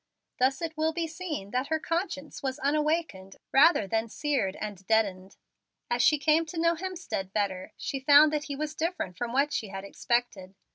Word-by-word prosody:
Thus 265 +5 +2
it 320 -1 -3
will 315 +1 0
be 335 0 -1
seen 315 - -5
that 255 +3 -1
her 315 0 0
conscience 330 -3 -3
was 265 -1 -2
unawakened, 300 - -1 0.2
rather 290 - +5
than 225 +3 -1
seared 255 -9 -1
and 205 -3 -6
deadened. 195 -4 0 0.5
As 240 0 +2
she 300 +6 +5
came 310 +3 +3
to 330 +1 -5
know 335 0 +3
Hemstead 340 - -5
better, 190 -3 -2
she 275 - -3
found 290 +3 +6
that 300 0 -1
he 285 - -4
was 305 +1 -3
different 320 - -3
from 240 +2 -4
what 280 +3 +1
she 220 - -2
had 195 0 -7
expected. 200 -3 -2
280 Hz, 185 wpm, -28 LUFS, 210-315 Hz, 0.5 s, found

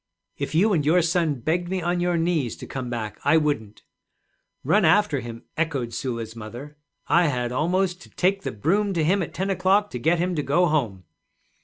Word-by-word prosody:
'If 155 - -4
you 200 +6 +4
and 155 -5 +2
your 165 +4 +3
son 165 -2 +1
begged 175 +6 -1
me 190 0 -1
on 175 +1 -1
your 175 -1 +1
knees 165 -8 0
to - - -9
come 130 -2 -5
back, 110 -4 -5
I 160 +3 +4
wouldn't.' 125 -9 -2 0.8
'Run 185 +10 +3
after 175 -3 +3
him!' 115 -1 -8
echoed 140 -8 -2
Sula's 115 -3 -4
mother. 120 +7 -9 0.3
'I 175 0 +4
had 125 -4 -1
almost 180 +6 0
to - - -14
take 195 +2 0
the - - -4
broom 195 - 0
to 165 -3 0
him 190 +5 +2
at 165 - -4
ten 195 +1 -1
o'clock 195 +2 +2
to 125 - -4
get 165 +8 +2
him 180 +2 0
to 155 - -1
go 150 +6 +2
home!' 120 - -1
160 Hz, 200 wpm, -24 LUFS, 125-180 Hz, 0.8 s, you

